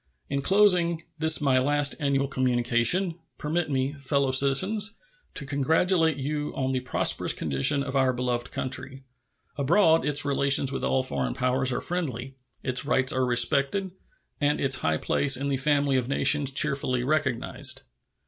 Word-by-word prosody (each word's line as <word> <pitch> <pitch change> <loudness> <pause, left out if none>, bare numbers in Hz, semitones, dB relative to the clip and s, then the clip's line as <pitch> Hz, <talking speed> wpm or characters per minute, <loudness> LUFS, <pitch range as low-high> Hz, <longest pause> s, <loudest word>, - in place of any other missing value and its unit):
In 140 0 -1
closing 180 -3 +2 0.2
this 160 0 +3
my 135 -3 +2
last 145 +2 +1
annual 140 -2 0
communication, 130 +7 0 0.2
permit 160 +2 -3
me, 135 0 -1
fellow 140 -1 -1
citizens, 185 +12 +1 0.4
to 145 - -6
congratulate 160 +3 +1
you 150 +2 -4
on 130 0 -2
the 130 - -1
prosperous 125 - +1
condition 75 - +1
of 140 -1 -6
our 130 -1 +2
beloved 125 -1 -3
country. 130 +1 -6 0.6
Abroad 165 +3 +3
its 145 -1 +2
relations 140 -1 +3
with 135 - -5
all 130 - 0
foreign 65 - -3
powers 130 +1 0
are 125 - -3
friendly, 135 -7 -4 0.3
its 130 -1 0
rights 130 -2 +1
are 130 -1 0
respected, 140 +9 +1 0.5
and 145 0 0
its 135 -1 +2
high 80 0 -1
place 135 - +1
in 140 +2 -3
the 135 - -1
family 140 -1 +1
of 125 0 -3
nations 145 0 +3
cheerfully 135 -3 0
recognized. 135 -3 -1
140 Hz, 150 wpm, -25 LUFS, 130-150 Hz, 0.6 s, this